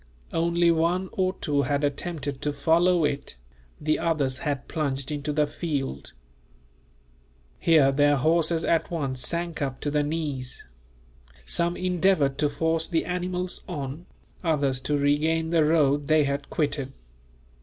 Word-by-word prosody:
Only 170 +1 +3
one 170 +3 +1
or 185 -1 0
two 145 -5 0
had 140 0 0
attempted 145 -1 -3
to 150 - -1
follow 165 +4 +3
it, 140 - -3 0.4
the 155 +1 0
others 140 -6 0
had 145 -4 -3
plunged 140 -2 -2
into 150 0 -2
the 150 0 +2
field. 140 - -4 1.5
Here 155 -5 +5
their 145 +1 +4
horses 160 +3 +2
at 165 - +1
once 140 -6 -2
sank 170 +2 -3
up 135 -2 -2
to 145 - -2
the 150 0 +2
knees. 145 -4 -3 0.8
Some 170 - 0
endeavoured 180 -6 +1
to 150 - +2
force 160 +2 0
the 165 -3 0
animals 180 +1 -3
on, 145 0 -5 0.4
others 140 -6 +1
to 150 - +1
regain 160 +3 +1
the 165 -2 +4
road 145 -2 +2
they 155 -1 +4
had 140 0 -2
quitted. 145 -3 -1
150 Hz, 140 wpm, -26 LUFS, 140-170 Hz, 1.5 s, Here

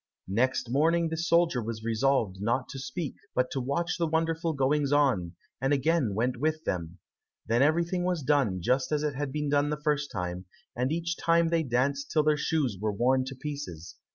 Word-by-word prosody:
Next 125 +3 +1
morning 165 +4 +2
the 160 - -2
soldier 170 -4 +2
was 110 0 -5
resolved 115 -4 +1
not 120 +5 0
to 135 - -6
speak, 150 +3 -5 0.2
but 125 0 +1
to 135 - -2
watch 155 +8 -1
the 170 - +1
wonderful 165 +1 0
goings 140 +1 +1
on, 125 -13 +2 0.3
and 135 +2 +2
again 140 -6 +1
went 125 +3 0
with 155 +4 -1
them. 85 -1 -3 0.5
Then 115 +2 +2
everything 170 +4 +2
was 180 -4 -1
done 125 - +1
just 130 - +1
as 150 -1 +1
it 150 -1 0
had 140 0 -3
been 150 +1 -2
done 145 0 +2
the 150 - -1
first 150 -1 0
time, 90 -1 -4 0.3
and 125 +3 0
each 170 +1 -2
time 170 0 +3
they 165 0 +2
danced 140 +1 0
until 155 - +2
their 155 0 +3
shoes 145 - -1
were 110 0 0
worn 130 +5 +2
to 135 +1 -6
pieces. 130 - -7
140 Hz, 195 wpm, -28 LUFS, 120-155 Hz, 0.5 s, time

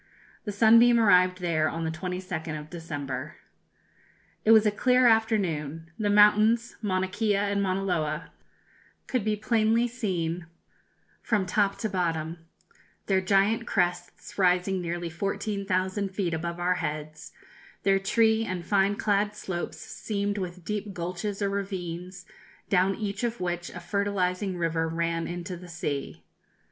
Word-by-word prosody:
The 210 - -2
Sunbeam 230 +3 +6
arrived 185 -4 +4
there 155 -3 +1
on 165 0 -4
the 160 - -1
22nd 175 -2 -4
of 150 +1 -12
December. 145 -6 -5 1.1
"It - - 0
was 220 -1 +7
a 210 - +4
clear 250 +4 +3
afternoon. 170 -9 +1
The 210 -1 +1
mountains, 210 +3 +4
Mauna 190 -3 0
Kea 205 +2 0
and 200 0 0
Mauna 195 0 0
Loa, 170 -6 -2 0.7
could 255 -5 -1
be 215 0 +1
plainly 225 +2 +2
seen 180 -8 -3 0.7
from 210 -4 0
top 200 +2 +1
to 220 - -2
bottom, 165 -4 -2 0.7
their 190 -1 +2
giant 195 +3 +2
crests 180 +1 -2
rising 180 0 +2
nearly 170 0 -3
14,000 195 +1 -1
feet 190 -3 -2
above 170 +2 -3
our 180 +1 +2
heads, 155 +1 -5 0.5
their 195 -1 +3
tree 220 +3 +3
and 185 -5 -4
fine 200 +1 +2
clad 205 0 0
slopes 185 -4 -4
seamed 205 -1 -3
with 180 -2 -6
deep 210 -1 -4
gulches 185 +4 -3
or 200 - +1
ravines, 180 -2 -5 0.4
down 190 0 +3
each 200 +1 -4
of 235 0 -1
which 175 -1 -3
a 180 - -8
fertilizing 190 0 -1
river 165 -1 0
ran 165 0 -1
into 175 +1 -5
the 175 +1 -11
sea. 145 -4 -4
190 Hz, 140 wpm, -27 LUFS, 175-210 Hz, 1.1 s, was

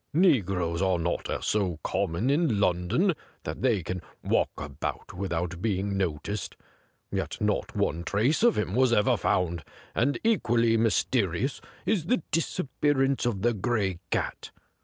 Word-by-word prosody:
Negroes 95 - +2
are 95 -2 +2
not 85 +1 -2 0.2
so 95 -6 0
common 100 +7 0
in 145 -8 +2
London 100 - +2 0.3
that - - -5
they 115 -8 +2
can 90 +1 -4 0.2
walk - - +2
about 75 0 -5
without 90 -2 -3
being 100 -2 0
noticed; 95 +2 -2 0.6
yet - - -3
not - - -1
one 85 +3 0
trace 115 - +1
of 235 0 +4
him 105 -3 -1
was 130 +1 +4
ever 105 -3 +4
found, 85 -3 0 0.3
and 140 +4 +1
equally 120 - +3
ixiysteri 110 -3 +1
ous 135 - -2 0.2
is 180 -8 +1
the 210 -4 +1
disappearance 140 -5 +1
of 100 -5 -2
the 120 0 +3
Gray 100 -4 -1
Cat. - - -2
105 Hz, 140 wpm, -27 LUFS, 90-130 Hz, 0.6 s, of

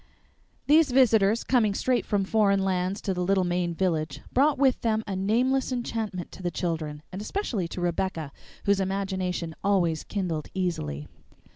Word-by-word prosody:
These 305 +1 +5
visitors, 230 -4 +4
coming 220 -6 +2
straight 255 +2 0
from 205 -2 +1
foreign 200 -1 +2
lands 185 +1 -1
to 195 - -1
the 180 - -3
little 190 +1 +2
Maine 175 -1 -1
village, 160 -4 -1
brought 280 +3 +3
with 265 -1 +3
them 220 -1 +1
a 195 - -3
nameless 245 +8 +1
enchantment 225 -7 -3
to - - -11
the 175 - -1
children, 155 -4 -3
and 190 +2 -6
especially 215 - -2
to 175 - -6
Rebecca, 175 -3 -2 0.3
whose 200 -1 +3
imagination 190 -3 -2
always 175 -6 +1
kindled 175 -7 -3
easily. 75 - -2
195 Hz, 155 wpm, -27 LUFS, 175-220 Hz, 0.3 s, These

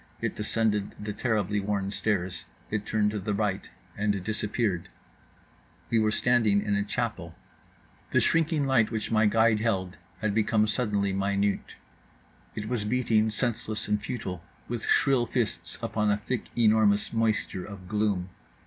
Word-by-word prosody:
It - - -2
descended 105 -1 0
the 105 0 -4
terribly 105 -3 0
worn 100 -1 -1
stairs. 95 -5 -1 0.3
It 105 -1 -2
turned 105 -1 +2
to 105 - -3
the 100 +2 -2
right 100 -2 -1 0.3
and 105 -2 0
disappeared…. 105 -3 -1 1.0
We 115 - +4
were 110 -1 +3
standing 110 -2 +3
in 105 - -1
a 100 - +2
chapel. 100 - -3 0.7
The - - +3
shrinking 160 -3 +2
light 130 -5 +3
which 110 -2 -3
my 110 -1 +4
guide 110 0 +4
held 95 -5 -1 0.2
had 105 0 0
become 110 0 +3
suddenly 105 -3 0
minute; 100 +1 0 0.8
it 105 0 -4
was 120 -2 -1
beating, 110 -1 +2
senseless 110 -1 -1
and 105 0 +1
futile, 95 -6 -5 0.2
with 120 -1 -4
shrill 130 -4 +3
fists 120 -4 -1
upon 105 -1 0
a 105 - +3
thick 120 +4 -3
enormous 110 -2 +3
moisture 110 -4 0
of 95 -2 -10
gloom. 100 -3 0
105 Hz, 150 wpm, -28 LUFS, 100-115 Hz, 1.0 s, We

